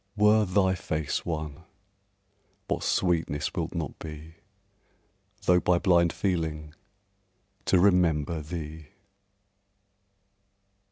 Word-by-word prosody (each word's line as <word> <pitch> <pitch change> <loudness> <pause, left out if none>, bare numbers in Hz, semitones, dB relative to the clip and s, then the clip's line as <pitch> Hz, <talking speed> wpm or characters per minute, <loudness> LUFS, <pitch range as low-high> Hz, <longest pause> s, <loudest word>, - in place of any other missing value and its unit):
Were 105 +1 +5
thy 95 0 +2
face 80 -4 -3
one, 75 -2 -4 1.1
what - - -1
sweetness 80 -5 0
will't - - -3
not - - -4
be, 80 +1 -9 1.1
Though 90 -1 +5
by 90 0 +2
blind 85 -2 +3
feeling, 80 -5 -2 0.9
to 95 - +4
remember 85 -4 +2
thee! 80 -1 -7
85 Hz, 90 wpm, -27 LUFS, 75-90 Hz, 1.1 s, Were